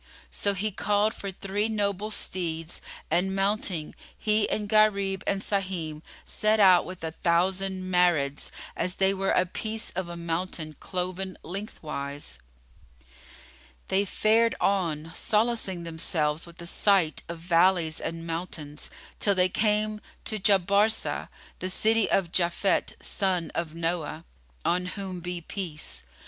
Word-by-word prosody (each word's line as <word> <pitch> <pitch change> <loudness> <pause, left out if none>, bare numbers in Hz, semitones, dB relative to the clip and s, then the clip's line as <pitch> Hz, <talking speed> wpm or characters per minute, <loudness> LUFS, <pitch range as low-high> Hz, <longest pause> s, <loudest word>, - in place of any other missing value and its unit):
So 200 -1 0
he 210 +3 -1
called 205 +2 +2
for 200 - -6
three 195 +3 -1
noble 205 -1 -1
steeds 170 -5 -1 0.3
and 185 +3 +2
mounting, 195 -5 0 0.2
he 215 0 +2
and 210 -1 -1
Gharib 200 -2 +3
and 195 0 +1
Sahim, 180 -6 -2 0.2
set 215 0 +2
out 185 -3 +7
with 185 -2 -8
a 160 - -2
thousand 185 +3 +1
Marids, 165 -6 +2 0.3
as 180 0 0
they 195 0 +3
were 195 0 -1
a 180 - +4
piece 220 +4 -3
of 185 -1 -3
a 170 - -6
mountain 165 -2 -3
cloven 185 0 -3
lengthwise. 145 - -5 1.5
They 195 +1 +3
fared 220 +3 +3
on, 165 -5 0
solacing 215 -5 +1
themselves 160 -1 -1
with 170 0 -14
the 170 - -8
sight 185 -2 +3
of 170 - -4
valleys 170 -1 +3
and 165 0 -4
mountains, 165 -3 -4 0.3
till 200 -2 +2
they 185 0 +4
came 210 +1 +1 0.2
to 215 - -2
Jabarsá,[FN#32] 200 +2 +2 0.3
the 185 - -2
city 220 +3 +3
of 180 -4 +2
Japhet 175 +3 +1
son 180 -5 0
of 165 -2 -3
Noah 165 -1 -2 0.4
(on 180 +1 +1
whom 185 -1 -5
be 175 0 -4
peace!) 155 - -4
185 Hz, 130 wpm, -27 LUFS, 170-200 Hz, 1.5 s, out